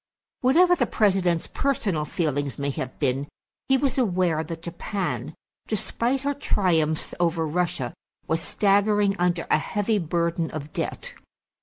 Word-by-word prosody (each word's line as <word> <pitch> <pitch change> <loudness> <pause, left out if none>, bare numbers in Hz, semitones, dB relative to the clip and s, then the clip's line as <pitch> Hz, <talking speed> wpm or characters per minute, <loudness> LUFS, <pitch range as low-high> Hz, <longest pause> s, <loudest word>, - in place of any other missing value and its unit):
Whatever 345 +8 +5
the - - +1
President's 185 -5 +2
personal 205 - -1
feelings 145 -4 -1
may 140 0 -1
have 130 -1 -5
been, 135 0 0 0.4
he 265 - +5
was 270 0 0
aware 180 -8 +1
that 165 +1 -7
Japan, 170 - -3 0.3
despite 235 +5 0
her 285 0 +1
triumphs 165 - +1
over 170 -1 +1
Russia, 155 -6 -1 0.3
was 165 +1 0
staggering 205 +3 +2
under 175 -1 +1
a - - +5
heavy 205 +5 0
burden 170 -1 -1
of 155 0 -7
debt. - - -4
175 Hz, 135 wpm, -25 LUFS, 155-210 Hz, 0.4 s, Whatever